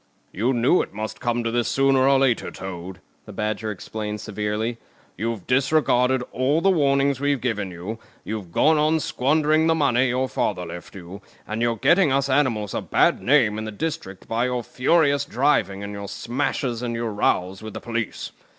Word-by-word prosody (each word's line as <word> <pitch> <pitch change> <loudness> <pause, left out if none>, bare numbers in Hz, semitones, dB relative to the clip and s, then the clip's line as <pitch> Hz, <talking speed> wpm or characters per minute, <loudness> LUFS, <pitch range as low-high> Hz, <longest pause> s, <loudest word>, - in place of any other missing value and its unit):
"You 115 +7 0
knew 125 +8 +3
it - - -7
must 110 0 -5
come 120 0 -1
to 115 - -1
this, 120 0 0
sooner 135 -1 +3
or 140 - +5
later, 135 -3 +1
Toad," 90 0 -8 0.3
the - - -8
Badger 110 0 -3
explained 105 +1 -5
severely. 110 +3 -3 0.4
You've 115 -1 -3
disregarded 130 -2 +2
all 130 +6 +1
the 195 +3 +3
warnings 140 -4 +2
we've 145 -1 +1
given 110 -5 -2
you, 90 +6 -7 0.2
you've 105 -5 -6
gone 155 - +3
on 155 +2 +2
squandering 155 +3 +2
the 165 - +3
money 130 -4 +2
your 130 +2 0
father 90 -7 -2
left 85 +2 -9
you, 95 +2 -9 0.3
and 110 +1 -3
you're 120 -1 +1
getting 170 - +4
us 140 +1 +1
animals 130 -7 +1
a - - -2
bad - - +2
name 120 -6 +3
in 110 - -4
the 110 - -5
district 105 - -5
by 115 +2 0
your 125 -1 -2
furious 140 +3 +2
driving 125 -7 +1
and 100 0 -6
your 100 0 -6
smashes 125 0 -2
and 120 -1 -3
your 115 -2 -3
rows 95 -2 0
with 110 -1 -8
the - - -4
police. 115 -2 -4
120 Hz, 185 wpm, -23 LUFS, 105-140 Hz, 0.4 s, or